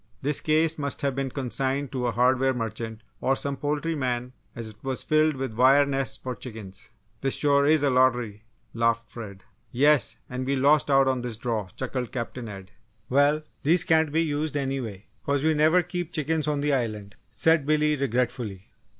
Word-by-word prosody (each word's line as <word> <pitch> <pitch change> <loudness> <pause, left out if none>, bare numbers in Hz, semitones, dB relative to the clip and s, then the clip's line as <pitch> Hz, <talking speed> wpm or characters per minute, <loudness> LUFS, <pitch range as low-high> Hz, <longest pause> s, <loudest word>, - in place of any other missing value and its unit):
This 145 +1 +1
case 155 +1 +1
must 140 -1 -2
have 140 -1 +1
been 135 0 -2
consigned 135 +1 -2
to 125 -2 -1
a - - +1
hardware 130 +3 +2
merchant 110 -1 -5 0.2
or 135 - +1
some 140 +1 -3
poultry 150 +3 -2
man 125 -3 -2 0.2
as 115 -1 -6
it 110 0 -13
was 135 -1 -2
filled 155 0 +2
with 130 -3 -4
wire 135 +5 +5
nests 135 -1 -1
for 130 - -5
chickens. 110 -6 -9 0.3
"This 135 0 +1
sure 140 -1 +3
is 155 -1 +4
a 140 - +3
lottery," 125 -5 +2 0.3
laughed 115 0 0
Fred. 100 -5 -9 0.3
"Yes, 145 +2 +3
and 125 +1 -4
we 135 +2 0
lost 145 +3 +3
out 135 -1 +5
on 130 -1 +1
this 120 -3 -4
draw!" 110 -4 -2
chuckled 125 -2 -4
Captain 120 -1 -5
Ed. 95 -1 -10 0.4
"Well, 145 +3 +3 0.2
these 165 +5 +3
can't 160 -2 +3
be 165 +2 +2
used 150 -1 -2
anyway, 130 -8 -3 0.2
'cause 140 0 0
we 160 0 +3
never 155 +4 +4
keep 175 -1 -4
chickens 155 -1 -1
on 145 -1 0
the 145 0 +1
Island," 105 -6 -2 0.2
said 145 +6 +2
Billy, 150 0 +3
regretfully. 120 -7 -2
135 Hz, 185 wpm, -26 LUFS, 120-150 Hz, 0.4 s, wire